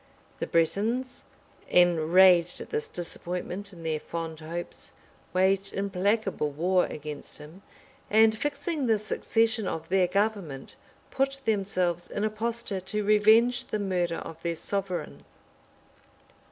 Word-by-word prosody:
The - - -2
Bretons, 225 +10 0 0.5
enraged 175 +1 +5
at - - -8
this 450 0 -1
disappointment 180 - -5
in 170 -3 -12
their 160 -1 -1
fond 165 0 -6
hopes, 170 +2 -7 0.4
waged 195 +1 +1
implacable 195 -3 0
war 180 +5 +1
against 150 -1 -8
him; 155 +6 -13 0.5
and 220 +1 +5
fixing 290 +3 -2
the 220 -1 +4
succession 220 +1 0
of 160 0 -4
their 185 -1 +3
government, 195 -8 -2 0.4
put 275 0 -1
themselves 185 -5 0
in 205 - -3
a 215 - +1
posture 225 -2 -3
to 210 +3 -3
revenge 225 +5 +4
the 215 - -2
murder 180 -4 -1
of 165 0 -8
their 170 -1 -2
sovereign. 175 - -4
195 Hz, 125 wpm, -27 LUFS, 170-220 Hz, 0.5 s, enraged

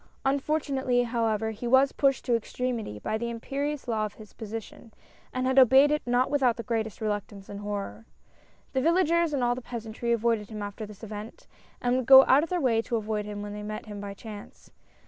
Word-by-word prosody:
Unfortunately, 270 -3 +1
however, 225 -2 0
he 220 +3 -6
was 265 +3 +5
pushed 275 -2 +1
to 245 - +2
extremity 230 - -3
by 215 - -3
the 235 0 -3
imperious 275 +5 -4
law 220 -2 0
of 210 - -4
his 215 -2 -14
position, 225 +1 -8 0.4
and 255 0 -2
had 260 +1 +4
obeyed 265 +3 +7
it 300 - +1
not 245 +2 +2
without 260 -5 +2
the 230 - -5
greatest 225 -2 -3
reluctance 205 -2 -4
and 200 - -7
horror. 205 +2 -5 0.7
The 265 - +1
villagers 340 +1 +3
and 275 -4 0
all 240 0 +2
the 250 - -6
peasantry 235 -1 -4
avoided 230 -2 +1
him 215 -2 -6
after 205 +1 -6
this 210 +1 -14
event, 215 +1 -8 0.4
and 245 +1 +2
would 255 -3 -2
go 265 0 +10
out 265 +3 +5
of 330 - -3
their 360 - 0
way 235 -6 +2
to 235 - -3
avoid 215 -1 -2
him 205 0 -6
when 205 0 -6
they 210 - -6
met 215 +1 -6
him 205 -2 -8
by 200 -1 -6
chance. 210 0 -11
235 Hz, 205 wpm, -27 LUFS, 215-260 Hz, 0.7 s, go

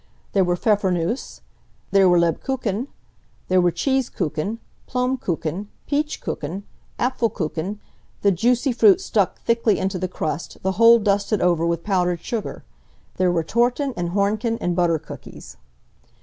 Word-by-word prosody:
There 195 - +4
were 175 -1 +1
Pfeffernusse; 190 +1 0 0.5
there, 195 -2 +5
were 175 - +5
Lebkuchen; 210 - 0 0.6
there 185 0 +4
were 175 - +4
cheese 265 - 0
kuchen; 170 +5 -2 0.3
plum 250 +1 0
kuchen, 170 +2 -3 0.2
peach 295 +1 -1
kuchen, 170 +7 -4 0.3
Apfelkuchen, 205 -7 -1 0.5
the 200 - +5
juicy 245 - +2
fruit 370 - +5
stuck 210 - 0
thickly 230 -4 +2
into 190 -1 -2
the 185 - -1
crust, 165 -2 -4
the 190 - +1
whole 230 +4 +7
dusted 205 -1 +1
over 170 -2 +2
with 170 -1 -1
powdered 180 -4 0
sugar. 225 +1 -4 0.5
There 185 -1 +3
were 170 -2 +1
Torten, 245 - +1
and 175 -1 -2
Hornchen, 210 +5 0
and 175 -1 -1
butter 170 -2 +2
cookies. - - -11
195 Hz, 140 wpm, -22 LUFS, 175-230 Hz, 0.6 s, whole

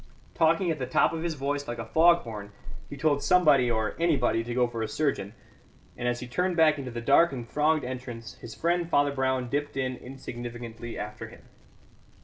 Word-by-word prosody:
Talking 165 - +2
at 155 - -3
the 130 - -3
top 130 - +3
of 160 - -3
his 165 -1 -2
voice 145 +1 -2
like 120 - -4
a 115 - -5
fog 170 +7 +5
horn, 105 -3 -8 0.4
he 145 - -7
told 145 0 +1
somebody 150 -9 +4
or 110 -2 0
anybody 135 -9 +2
to 120 +1 -5
go 125 -1 +3
for 115 -1 -5
a 110 - -1
surgeon; 115 -9 -2 0.6
and 120 - -3
as 120 0 -1
he 125 - -6
turned 180 +8 -1
back 155 -2 +4
into 130 -2 -5
the 120 -1 -5
dark 140 +7 +5
and 120 -3 -6
thronged 150 +3 +1
entrance 120 -4 -6
his 115 - -9
friend 170 0 0
Father 145 -2 +3
Brown 130 -2 0
dipped 145 +2 -3
in 130 -1 -1
insignificantly 120 -3 -8
after 105 +1 -6
him. - - -15
130 Hz, 200 wpm, -27 LUFS, 120-155 Hz, 0.6 s, fog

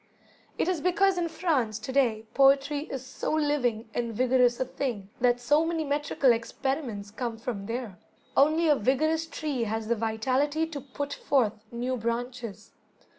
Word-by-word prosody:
It - - +1
is 360 -4 0
because 375 +1 +3
in 340 - 0
France, 290 - 0
to 220 +4 -6
day, 235 -5 +2
poetry 280 +2 +4
is 265 -1 -5
so - - -4
living 255 -7 0
and 235 -2 -2
vigorous 250 0 +3
a 260 - +1
thing, 240 -7 -4
that 245 0 +3
so 290 +6 +3
many 325 -1 -1
metrical 285 -2 +2
experiments 230 -2 -2
come 235 0 -4
from 225 -4 -5
there. 230 -6 -5 0.4
Only 310 +4 +4
a 300 - +6
vigorous 310 +7 +1
tree 290 -7 -2
has 220 0 -3
the 235 - +3
vitality 255 +8 0
to 310 -3 -6
put 280 +2 -5
forth 255 -7 +1 0.2
new 245 +2 -2
branches. 235 -1 -4
260 Hz, 160 wpm, -28 LUFS, 230-295 Hz, 0.4 s, a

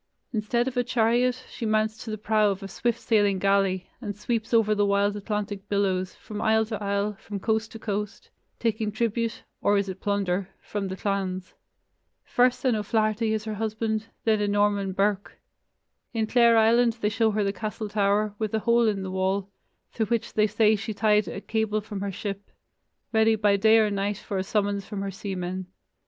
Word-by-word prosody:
Instead 235 +3 0
of 265 - -3
a 245 - +2
chariot, 245 +2 +1
she - - -8
mounts 215 0 +1
to 225 - -9
the 215 - -3
prow 215 0 +2
of 195 -1 -3
a - - -5
swift 235 +3 -1
sailing 205 -5 +2
galley, 195 -1 +1
and 205 -4 -4
sweeps 225 +1 -2
over 225 -2 +4
the 205 -1 +2
wild 200 0 +2
Atlantic 205 -1 -4
billows, 190 -2 0
from 210 -1 -7
isle 220 0 +3
to 215 -1 -5
isle, 200 +1 0
from 205 -1 -6
coast 220 +1 0
to - - -8
coast, 210 -2 -4 0.3
taking 220 -2 -1
tribute 230 +1 -1 0.2
(or 205 0 +3
is 200 0 0
it 190 0 -6
plunder?) 195 -2 0
from 205 -2 -4
the 190 - -4
clans. 190 -2 -2 0.7
First 250 +2 +2
an 250 -3 +3
O'Flaherty 215 +1 0
is 220 -1 -1
her 220 - -3
husband, 220 +1 -2 0.2
then 215 -2 +2
a 205 - +1
Norman 205 -1 +1
Burke. 200 +1 -1 0.8
In 220 -1 +1
Clare 235 0 +5
Island 230 +1 +4
they 210 - +2
show 225 +1 +2
her 205 -2 0
castle 215 +1 -4
tower, 205 0 +1
with 220 -1 -1
a - - +2
hole 235 +1 +3
in 200 -3 0
the 190 - -5
wall, 190 +1 -1 0.4
through 220 -2 -1
which 235 +1 -1
they 215 0 +3
say 215 +1 +3
she 215 +1 -5
tied 210 0 +3
a 195 - -5
cable 220 -1 0
from 210 -2 -6
her 200 0 -2
ship, 200 +1 -5 0.6
ready 220 0 +4
by 205 -1 +3
day 220 +3 +5
or 215 -2 +3
night 200 0 -1
for 200 -2 -4
a - - 0
summons 200 0 0
from 200 -1 -5
her 195 - -3
seamen. 185 -1 -4
210 Hz, 195 wpm, -26 LUFS, 200-220 Hz, 0.8 s, Clare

